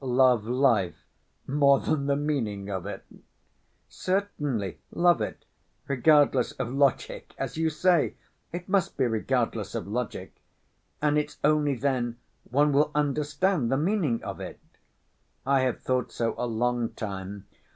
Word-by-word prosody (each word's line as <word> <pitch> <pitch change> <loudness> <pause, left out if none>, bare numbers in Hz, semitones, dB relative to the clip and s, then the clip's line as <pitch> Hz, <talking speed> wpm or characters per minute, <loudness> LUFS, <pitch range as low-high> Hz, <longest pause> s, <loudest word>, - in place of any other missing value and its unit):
"Love 125 -3 +3
life 120 -8 +1 0.4
more 140 -1 +4
than 145 -3 -1
the 140 - +2
meaning 115 -10 -2
of 95 -1 -4
it?" 105 - -7 0.8
"Certainly, 145 - -2
love 175 0 +3
it, - - -5 0.4
regardless 140 -1 +4
of 120 - -4
logic 140 -2 0
as - - -4
you 160 0 +1
say, 165 -2 +2 0.4
it 175 +1 -6
must 195 -2 +1
be 130 - +2
regardless 115 -2 -1
of 115 - -3
logic, 120 +2 -4 0.7
and 150 0 +3
it's 150 0 -5
only 150 -2 +3
then 125 -2 -1 0.3
one 145 +3 +3
will 150 +2 +4
understand 150 0 +1
the 135 - +3
meaning 155 - 0
of - - -6
it. - - -7 0.9
I 135 0 +3
have 130 -2 -1
thought 130 -1 0
so 115 -1 -1
a 125 - -2
long 120 +1 0
time. 100 -1 -6
135 Hz, 140 wpm, -27 LUFS, 115-150 Hz, 0.9 s, more